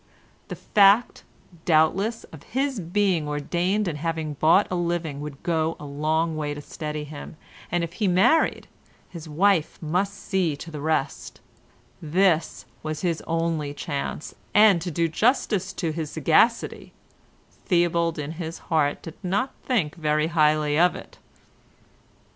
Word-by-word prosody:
The - - -6
fact, 205 +3 +4 0.4
doubtless, 180 +8 +2
of 155 - -10
his 265 - -2
being 180 -2 0
ordained 175 +8 -1
and 150 -3 -3
having 160 -1 -2
bought 160 +7 +4
a - - 0
living 170 -4 -2
would 145 -2 -8
go 165 -1 0
a 150 - -8
long 155 +3 -1
way 150 -1 -3
to 145 - -7
steady 150 0 -5
him, 150 +1 -9 0.3
and 175 0 +1
if 170 0 -5
he 210 +1 -1
married, 225 - +3 0.4
his 165 -3 -9
wife 170 +1 +2
must 180 +5 -1
see 185 -8 -1
to 165 - -9
the 150 -2 -6
rest; 150 -2 -2 0.6
this 165 0 +1 0.2
was 155 -1 -4
his 170 -3 -1
only 165 -3 -1
chance 145 +1 -4 0.2
and, 205 -4 +6
to 175 - -3
do 165 +1 0
justice 200 - +1
to 165 -4 -2
his 155 -1 -4
sagacity, 165 - +1 0.7
Theobald 170 -2 +2
in 150 0 -4
his 165 0 -6 0.2
heart 145 -2 +1
did 165 - -8
not 200 +8 -1
think 195 - 0
very 155 -2 0
highly 150 -1 +3
of 175 +1 +4
it. - - -11
165 Hz, 145 wpm, -24 LUFS, 155-185 Hz, 0.7 s, and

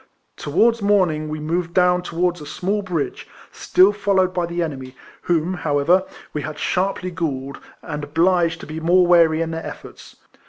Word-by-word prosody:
Towards 225 +10 +1
morning 180 -7 +1
we 155 0 -4
moved 170 +2 -3
down 180 -1 +3
towards 175 -1 -2
a - - -8
small 200 +7 -2
bridge, 175 -7 -4 0.2
still 190 +3 +3
folloAved 195 -3 +1
by 175 -2 -1
the 170 0 -2
enemy, 135 -5 -6 0.3
whom, 175 +1 0
however, 160 +3 +1 0.3
we 150 - -3
had 150 +2 -6
sharply 185 +2 -1
galled, 140 -6 -4 0.2
and 150 -3 -5
obliged 165 +2 +1
to - - -8
be 155 +1 -6
more 175 +3 +4
wary 165 -2 +4
in 165 - -5
their 165 0 -5
efforts. - - -10
170 Hz, 165 wpm, -21 LUFS, 155-185 Hz, 0.3 s, more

